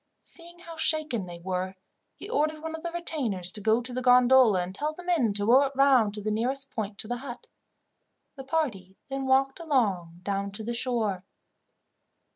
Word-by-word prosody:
Seeing 345 0 -5
how 335 -1 -11
shaken 310 - 0
they 175 -1 -8
were, 185 +2 -3 0.4
he - - -10
ordered 310 -8 -1
one 320 0 -4
of 320 - -6
the 340 - -3
retainers 250 - 0
to 210 - 0
go 220 +3 +3
to 250 +1 -5
the 255 - -2
gondola, 250 -4 +6
and 180 +1 -7
tell 300 +9 -2
the 360 - -11
men 330 -11 +2
to 205 0 0
row 250 +5 +6
it 275 - -9
round 260 -6 +4
to 210 - -7
the 215 - -1
nearest 260 +5 0
point 210 -2 -4
to 215 - -5
the 245 +1 -2
hut. 245 -1 -8 0.9
The 270 - -8
party 245 - -2
then 270 0 -3
walked 270 +2 +2
along 195 - -1
down 200 0 -2
to 220 +2 -5
the 235 +2 -3
shore. 230 -6 -1
245 Hz, 195 wpm, -27 LUFS, 205-290 Hz, 0.9 s, gondola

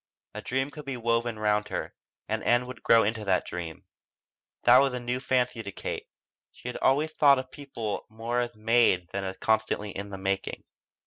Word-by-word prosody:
A - - -6
dream 135 +2 -1
could 150 -1 -9
be 135 -2 -4
woven 115 -1 0
round 105 -1 +1
her, - - -4 0.3
and - - -2
Ann 120 +1 +3
could 125 -1 -9
grow 115 -1 +5
into 110 +1 -1
that 95 -2 +1
dream. 85 -2 -6 0.8
That - - +8
was 135 -2 +2
a - - -2
new 125 +1 -2
fancy 125 -2 0
to 100 -2 -6
Kate; - - -5 0.4
she 125 - -8
had - - -5
always 150 +4 +2
thought 140 -3 +6
of 130 0 -5
people 125 -8 -5
more 115 +2 -2
as 120 -2 -2
made 110 -5 +3
than 100 0 -3
as 95 0 -4
constantly 110 -1 0
in 100 +1 -6
the 100 - -6
making. 95 0 -2
115 Hz, 195 wpm, -28 LUFS, 105-125 Hz, 0.8 s, That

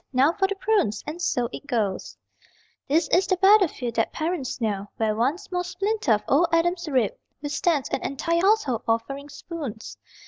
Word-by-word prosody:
Now 265 +5 +4
for 385 +1 +1
the 400 - -3
prunes.... 385 - 0
And 315 +4 -6
so 245 -8 0
it 285 - -8
goes. 215 -8 -2 0.7
This 315 +5 +2
is 365 +1 +3
the 370 - +1
battlefield 375 - +4
that 225 - +1
parents 315 -6 -3
know, 205 -3 -2
Where 220 -1 0
one 255 +9 +1
small 360 -2 -4
splinter 370 - 0
of 210 - 0
old 325 +5 +4
Adam's 345 +1 +1
rib 255 -7 +2 0.3
Withstands 290 0 0
an - - -2
entire 335 +5 0
household 380 - +2
offering 275 +6 -2
spoons. 285 -6 -7
295 Hz, 170 wpm, -25 LUFS, 240-360 Hz, 0.7 s, Now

